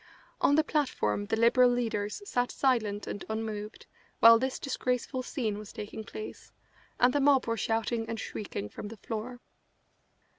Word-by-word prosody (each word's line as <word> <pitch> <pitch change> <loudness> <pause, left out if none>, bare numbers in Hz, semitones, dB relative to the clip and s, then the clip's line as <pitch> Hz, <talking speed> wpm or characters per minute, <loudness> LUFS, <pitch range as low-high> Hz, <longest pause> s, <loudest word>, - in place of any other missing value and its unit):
On 285 - +5
the 310 - +4
platform 105 - 0
the - - +1
Liberal 235 +2 +5
leaders 225 - -1
sat 245 -6 0
silent 220 -6 +1
and 205 - -5
unmoved 220 -1 -4 0.3
while 230 0 +9
this 260 +1 -1
disgraceful 255 -1 -2
scene 230 -6 -3
was 210 - -9
taking 210 +1 -7
place, 430 - -9 0.5
and 245 +1 +5
the 290 - +2
mob 275 -2 +4
were 230 - 0
shouting 225 +1 -1
and 225 -1 -3
shrieking 150 - -5
from 155 - -8
the 225 +2 -9
floor. 230 +4 -6
230 Hz, 155 wpm, -30 LUFS, 215-255 Hz, 0.5 s, while